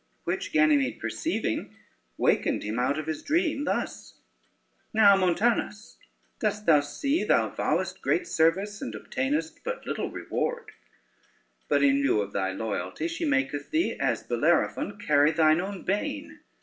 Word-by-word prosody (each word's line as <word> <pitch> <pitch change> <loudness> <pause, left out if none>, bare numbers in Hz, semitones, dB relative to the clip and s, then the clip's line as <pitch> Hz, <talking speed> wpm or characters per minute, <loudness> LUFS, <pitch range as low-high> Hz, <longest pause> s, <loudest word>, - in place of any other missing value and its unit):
Which - - -3
Ganymede 150 -4 +3
perceiving - - -3 0.4
wakened - - +1
him 105 +3 -3
out 130 +4 +1
of 155 - -4
his 160 -1 -4
dream 305 -2 0
thus: - - -3 0.8
"Now, 205 -2 +7
Montanus, 210 +3 0 0.4
dost 210 -1 -1
thou 155 -3 +6
see 275 - -1
thou - - +2
vowest - - -2
great 360 -2 +1
service 195 - +1
and 110 - -5
obtainest 145 +8 -3
but 485 +1 -5
little - - -3
reward; 475 0 -3 1.0
but - - +2
in 280 0 +4
lieu 275 - +2
of 100 0 -6
thy 95 -1 -1
loyalty, 105 - -3
she 170 0 -3
maketh 135 +1 0
thee, 330 +3 0
as - - 0
Bellerophon, 205 - 0
carry 150 -7 +3
thine 155 +1 +3
own 195 0 -6
bane. 295 +9 -3
170 Hz, 140 wpm, -27 LUFS, 145-240 Hz, 1.0 s, Now